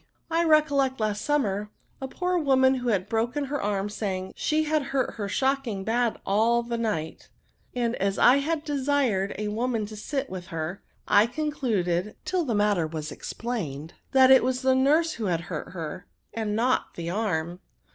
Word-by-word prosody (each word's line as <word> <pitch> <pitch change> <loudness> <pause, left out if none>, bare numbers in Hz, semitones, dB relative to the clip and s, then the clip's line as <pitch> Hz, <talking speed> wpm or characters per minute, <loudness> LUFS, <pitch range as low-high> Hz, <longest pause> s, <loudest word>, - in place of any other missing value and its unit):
I 330 +1 +2
recollect 285 -5 +3
last 210 -1 -1
summer, 210 -9 0 0.3
a 265 - -3
poor 360 +6 -2
woman 265 -3 +4
who 250 -2 -2
had 195 -3 0
broken 235 +6 -1
her 285 +1 -3
arm 200 -1 -1
saying, 195 -3 -4
she 310 +1 +1
had 310 0 +1
hurt 275 -2 -1
her 205 -3 -4
shocking 265 -6 0
bad 235 +2 0
all 230 +4 +2
the 235 0 -3
night; 185 -9 -3 0.5
and 240 -1 0
as 195 +1 0
I 255 +3 +6
had 300 +2 -1
desired 275 -9 0
NOUNS. - - -4
IS^ - - -2
a 210 - -2
womaxL 230 -2 -1
to 215 - -8
sit 270 +6 -2
up - - -19
with 185 -1 -6
her, 165 +4 -4 0.3
I 210 +2 +5
conchided 220 - -1
(till 365 -3 0
the 235 -5 -1
matter 205 -5 +2
was 155 -1 -5
explained), 165 - -5 0.2
that 265 -1 +6
it 265 - +7
was 255 +1 -1
the 260 0 +4
nurse 300 +5 +3
who 225 - -4
had 170 -3 0
hurt 165 -2 -6
her, 165 -1 -6 0.3
and 215 -2 -2
not 245 +3 0
the 170 0 -4
arm." 175 -4 -2
230 Hz, 185 wpm, -26 LUFS, 195-270 Hz, 0.5 s, it